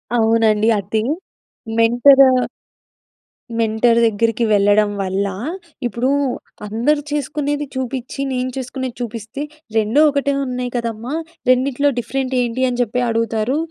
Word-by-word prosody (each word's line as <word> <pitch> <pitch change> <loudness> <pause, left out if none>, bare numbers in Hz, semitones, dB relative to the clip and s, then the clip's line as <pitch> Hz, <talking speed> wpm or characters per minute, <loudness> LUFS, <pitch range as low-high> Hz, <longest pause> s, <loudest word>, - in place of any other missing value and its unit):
అవునండి. 220 -2 +3
అదె, 205 +3 -1 0.8
mentor, 245 +4 +6 1.3
mentor 230 +1 +3
దగ్గరికి 230 +2 +1
వెళ్ళడం 205 +1 +4
వల్ల, 195 +1 -1 0.6
ఇప్పుడు 240 +2 -1 0.6
అందరూ 235 +8 +1
చేసుకునేది 290 0 -2
చూపించి, 260 +1 -4
నేను 255 0 -1
చేసుకునేది 260 -1 -4
చూపిస్తే, 230 +3 -5 0.3
"రెండు 220 +6 +3
ఒకటే 280 0 0
ఉన్నాయి 250 -1 -3
కదమ్మా! 235 +3 -3 0.3
రెండిట్లో 260 +2 +3
డిఫరెంట్ 260 +2 -2
ఏంటి 245 +1 -1
అని 245 -1 -3
చెప్పి 245 +1 0
అడుగుతారు. 230 +2 0
240 Hz, 105 wpm, -19 LUFS, 220-260 Hz, 1.3 s, mentor